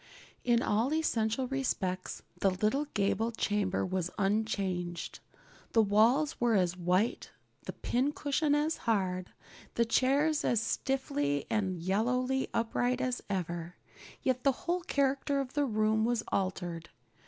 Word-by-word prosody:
In 240 Hz, -1 st, +3 dB
all 225 Hz, +6 st, +1 dB
essential 245 Hz, -5 st, 0 dB
respects 195 Hz, -9 st, -2 dB, 0.2 s
the 195 Hz, -, +3 dB
little 215 Hz, +10 st, 0 dB
gable 210 Hz, +3 st, +1 dB
chamber 205 Hz, -4 st, 0 dB
was 185 Hz, -2 st, -1 dB
unchanged. 195 Hz, -4 st, -1 dB, 0.5 s
The 225 Hz, -, +5 dB
walls 230 Hz, +10 st, +3 dB
were 235 Hz, -2 st, +3 dB
as 180 Hz, -2 st, +2 dB
white, 180 Hz, +5 st, 0 dB, 0.4 s
the -, -, -5 dB
pincushion 290 Hz, +3 st, 0 dB
as 305 Hz, +2 st, +1 dB
hard, 185 Hz, -4 st, 0 dB, 0.5 s
the 235 Hz, -, +3 dB
chairs 280 Hz, +6 st, +2 dB
as 235 Hz, -, +2 dB
stiffly 145 Hz, -, -1 dB
and 195 Hz, -4 st, 0 dB
yellowly 250 Hz, +9 st, 0 dB
upright 245 Hz, +2 st, 0 dB
as 255 Hz, -1 st, -1 dB
ever. 175 Hz, -2 st, -3 dB, 0.5 s
Yet 255 Hz, -2 st, 0 dB
the 275 Hz, -, +5 dB
whole 355 Hz, +1 st, 0 dB
character 280 Hz, -2 st, 0 dB
of 265 Hz, -2 st, -4 dB
the 290 Hz, -1 st, +2 dB
room 215 Hz, -2 st, +1 dB
was 235 Hz, -1 st, +1 dB
altered. 175 Hz, -3 st, -2 dB
225 Hz, 130 wpm, -31 LUFS, 190-265 Hz, 0.5 s, The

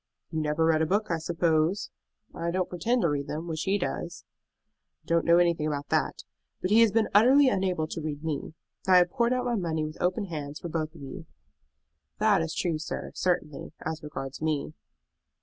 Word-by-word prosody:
"You 160 Hz, -2 st, -1 dB
never 150 Hz, +1 st, +1 dB
read 160 Hz, -1 st, +3 dB
a 160 Hz, -, +2 dB
book, 205 Hz, +3 st, 0 dB
I 165 Hz, -, 0 dB
suppose?" 165 Hz, +2 st, +1 dB, 0.4 s
"I 170 Hz, -, -3 dB
don't 180 Hz, +1 st, 0 dB
pretend 225 Hz, +8 st, 0 dB
to 170 Hz, -, +3 dB
read 140 Hz, -1 st, -2 dB
them, 160 Hz, +3 st, -4 dB
which 160 Hz, -1 st, -3 dB
he 195 Hz, +1 st, +2 dB
does." 175 Hz, -2 st, -4 dB, 0.8 s
"I -, -, -36 dB
don't 170 Hz, 0 st, +1 dB
know 170 Hz, 0 st, +6 dB
anything 170 Hz, -3 st, +2 dB
about 145 Hz, -1 st, -3 dB
that; -, -, 0 dB, 0.4 s
but 185 Hz, -, -2 dB
he 225 Hz, +2 st, +7 dB
has 225 Hz, -3 st, +5 dB
been 220 Hz, +1 st, +2 dB
utterly 260 Hz, +7 st, +6 dB
unable 185 Hz, -7 st, 0 dB
to 165 Hz, -, -4 dB
read 150 Hz, -1 st, -5 dB
me. 155 Hz, 0 st, -4 dB, 0.3 s
I 185 Hz, -1 st, +7 dB
have 175 Hz, -1 st, +4 dB
poured 235 Hz, 0 st, +1 dB
out 250 Hz, 0 st, 0 dB
my 245 Hz, -, 0 dB
money 165 Hz, -7 st, -1 dB
with 155 Hz, 0 st, -8 dB
open 185 Hz, +4 st, +1 dB
hands 150 Hz, -4 st, -6 dB
for 170 Hz, -, -6 dB
both 155 Hz, 0 st, -3 dB
of 155 Hz, -, -12 dB
you." 135 Hz, +4 st, -8 dB, 0.9 s
"That 210 Hz, -4 st, +3 dB
is 165 Hz, 0 st, -3 dB
true, 165 Hz, -4 st, -1 dB
sir, 155 Hz, +1 st, -5 dB
certainly, 160 Hz, -6 st, -2 dB
as 160 Hz, 0 st, -3 dB
regards 140 Hz, -2 st, -6 dB
me." 155 Hz, -1 st, -1 dB
165 Hz, 200 wpm, -28 LUFS, 155-185 Hz, 0.9 s, he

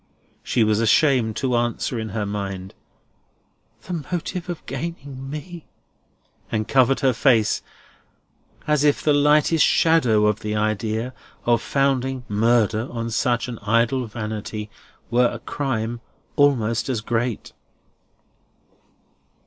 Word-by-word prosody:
She 120 Hz, -, +1 dB
was 110 Hz, 0 st, +2 dB
ashamed 115 Hz, -1 st, +3 dB
to 130 Hz, -3 st, 0 dB
answer 120 Hz, 0 st, -1 dB
in 110 Hz, 0 st, -4 dB
her 105 Hz, 0 st, -2 dB
mind, 100 Hz, -2 st, -5 dB, 1.1 s
"The 170 Hz, -4 st, -4 dB
motive 180 Hz, 0 st, -3 dB
of 175 Hz, -, -6 dB
gaining 135 Hz, -2 st, -6 dB
me!" 165 Hz, +3 st, -8 dB, 0.8 s
And 110 Hz, -1 st, -1 dB
covered 135 Hz, +1 st, +3 dB
her 135 Hz, -2 st, +3 dB
face, 115 Hz, -3 st, +3 dB, 1.0 s
as 150 Hz, -1 st, +2 dB
if 145 Hz, -1 st, +2 dB
the 150 Hz, -, +3 dB
lightest 150 Hz, +2 st, +4 dB
shadow 125 Hz, -11 st, +4 dB
of 105 Hz, 0 st, +1 dB
the 105 Hz, 0 st, -3 dB
idea 110 Hz, +3 st, -1 dB, 0.3 s
of 120 Hz, -2 st, +3 dB
founding 135 Hz, -2 st, 0 dB
murder 110 Hz, +1 st, +2 dB
on 115 Hz, -1 st, -4 dB
such 120 Hz, +1 st, 0 dB
an 120 Hz, -3 st, -6 dB
idle 115 Hz, +4 st, +1 dB
vanity 105 Hz, -1 st, -5 dB, 0.4 s
were 120 Hz, +1 st, +4 dB
a 120 Hz, -, -5 dB
crime 120 Hz, -2 st, -3 dB, 0.3 s
almost 125 Hz, -5 st, +2 dB
as 120 Hz, -5 st, -1 dB
great. 115 Hz, +1 st, -2 dB
120 Hz, 120 wpm, -22 LUFS, 110-140 Hz, 1.1 s, lightest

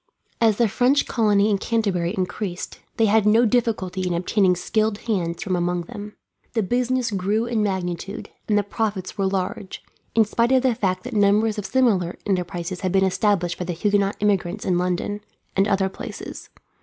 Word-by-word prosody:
As 220 Hz, -3 st, +4 dB
the 235 Hz, -, +4 dB
French 250 Hz, +7 st, +2 dB
colony 210 Hz, -2 st, +2 dB
in 200 Hz, -, +1 dB
Canterbury 200 Hz, -6 st, 0 dB
increased, 185 Hz, 0 st, -4 dB, 0.2 s
they 225 Hz, -, +4 dB
had 215 Hz, 0 st, +4 dB
no 225 Hz, +3 st, +5 dB
difficulty 215 Hz, -6 st, 0 dB
in 175 Hz, -, 0 dB
obtaining 185 Hz, +1 st, +2 dB
skilled 215 Hz, +4 st, 0 dB
hands 180 Hz, -7 st, -2 dB
from 185 Hz, -2 st, -1 dB
among 175 Hz, 0 st, 0 dB
them. 205 Hz, +4 st, -9 dB, 0.4 s
The 225 Hz, -3 st, +1 dB
business 245 Hz, +2 st, 0 dB
grew 205 Hz, +4 st, 0 dB
in 235 Hz, -2 st, 0 dB
magnitude, 190 Hz, -1 st, -3 dB, 0.2 s
and 210 Hz, -, +3 dB
the 205 Hz, -, +2 dB
profits 200 Hz, -2 st, -3 dB
were 195 Hz, -2 st, 0 dB
large, 190 Hz, 0 st, -3 dB, 0.3 s
in 225 Hz, -1 st, +5 dB
spite 235 Hz, +4 st, +1 dB
of 260 Hz, -1 st, +4 dB
the 260 Hz, -2 st, +3 dB
fact 185 Hz, -5 st, -1 dB
that 250 Hz, -, -6 dB
numbers 210 Hz, +1 st, +3 dB
of 200 Hz, -, -4 dB
similar 210 Hz, -10 st, +2 dB
enterprises 180 Hz, -2 st, -2 dB
had 185 Hz, -2 st, 0 dB
been 190 Hz, 0 st, +3 dB
established 185 Hz, -2 st, +1 dB
by 180 Hz, -, -2 dB
the 175 Hz, -, -2 dB
Huguenot 200 Hz, +3 st, +1 dB
immigrants 200 Hz, -1 st, 0 dB
in 180 Hz, -1 st, +2 dB
London, 180 Hz, +3 st, -1 dB, 0.3 s
and 195 Hz, +1 st, +3 dB
other 195 Hz, -2 st, +2 dB
places. 190 Hz, -, -8 dB
200 Hz, 180 wpm, -23 LUFS, 185-220 Hz, 0.4 s, no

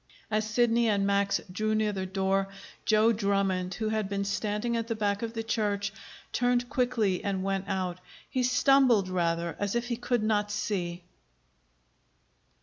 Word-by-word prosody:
As 215 Hz, 0 st, 0 dB
Sidney 235 Hz, 0 st, +3 dB
and 200 Hz, -2 st, +2 dB
Max 200 Hz, 0 st, +2 dB
drew 215 Hz, +3 st, 0 dB
near 215 Hz, -1 st, +1 dB
the 190 Hz, -1 st, -3 dB
door, 195 Hz, +1 st, 0 dB, 0.4 s
Joe 220 Hz, +1 st, +4 dB
Drummond, 195 Hz, -4 st, 0 dB
who 220 Hz, +1 st, -2 dB
had 215 Hz, -2 st, -1 dB
been 200 Hz, 0 st, -1 dB
standing 210 Hz, +3 st, -1 dB
at 230 Hz, -1 st, -2 dB
the 230 Hz, -, -1 dB
back 205 Hz, -2 st, 0 dB
of 230 Hz, -1 st, -3 dB
the 225 Hz, -1 st, -3 dB
church, 205 Hz, -3 st, -1 dB, 0.4 s
turned 245 Hz, 0 st, +1 dB
quickly 235 Hz, -7 st, +1 dB
and 195 Hz, -2 st, -1 dB
went 195 Hz, 0 st, -1 dB
out. 185 Hz, -3 st, -2 dB, 0.3 s
He 255 Hz, -, -1 dB
stumbled, 250 Hz, -4 st, +4 dB
rather, 170 Hz, -2 st, 0 dB
as 205 Hz, +2 st, -1 dB
if 240 Hz, +1 st, -1 dB
he 235 Hz, -, -1 dB
could 245 Hz, -2 st, 0 dB
not 210 Hz, -1 st, +1 dB
see. 190 Hz, -4 st, -3 dB
210 Hz, 160 wpm, -29 LUFS, 195-230 Hz, 0.4 s, Joe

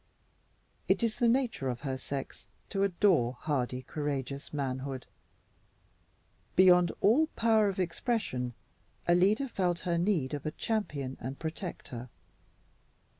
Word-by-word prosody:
It -, -, +2 dB
is 225 Hz, -2 st, 0 dB
the 240 Hz, -, +4 dB
nature 235 Hz, -, +1 dB
of 120 Hz, -1 st, -4 dB
her 135 Hz, -2 st, -2 dB
sex 135 Hz, +1 st, -6 dB, 0.2 s
to 195 Hz, -, -1 dB
adore 180 Hz, -, +3 dB
hardy, 130 Hz, -2 st, -2 dB
courageous 140 Hz, -1 st, -4 dB
manhood. 135 Hz, -2 st, -3 dB, 1.5 s
Beyond 180 Hz, -2 st, +6 dB
all 270 Hz, +10 st, +5 dB
power 220 Hz, -2 st, +4 dB
of 195 Hz, -, -4 dB
expression, 165 Hz, -, -1 dB, 0.5 s
Alida 195 Hz, +9 st, +4 dB
felt 180 Hz, -7 st, 0 dB
her 170 Hz, -2 st, 0 dB
need 170 Hz, -7 st, +1 dB
of 145 Hz, -, -3 dB
a 155 Hz, -, -5 dB
champion 150 Hz, -, -2 dB
and 130 Hz, +3 st, -5 dB
protector. 155 Hz, -7 st, -6 dB
165 Hz, 120 wpm, -31 LUFS, 130-200 Hz, 1.5 s, Beyond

